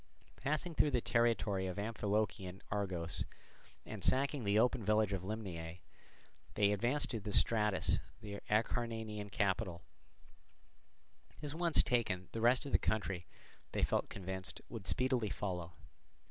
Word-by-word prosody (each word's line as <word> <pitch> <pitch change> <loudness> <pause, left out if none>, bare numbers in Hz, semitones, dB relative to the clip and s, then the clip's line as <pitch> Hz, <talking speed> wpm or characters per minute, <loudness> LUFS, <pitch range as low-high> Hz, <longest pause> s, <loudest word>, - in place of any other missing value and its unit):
Passing 155 +4 -1
through 150 - +4
the 125 -3 +2
territory 115 -5 +2
of 90 - -4
Amphilochian 100 -3 -1
Argos, 95 -5 -1 0.6
and 110 -3 -6
sacking 140 0 +2
the 100 0 +3
open 120 +1 +3
village 105 0 +3
of 95 - -1
Limnaea, 90 -5 -5 0.8
they 100 -1 +4
advanced 120 +8 +1
to 105 -3 -3
Stratus 105 -2 +3 0.2
the 100 -1 -6
Acarnanian 110 -1 0
capital; 95 -4 0 1.6
this 145 -1 -5
once 170 0 +4
taken, 105 -7 0
the 115 - -3
rest 125 +5 +4
of 140 - -5
the - - +5
country, 95 -5 -1 0.5
they - - 0
felt - - +1
convinced, 95 0 -5
would 110 -7 -7
speedily 125 - +1
follow. 90 -2 -3
105 Hz, 130 wpm, -36 LUFS, 95-120 Hz, 1.6 s, the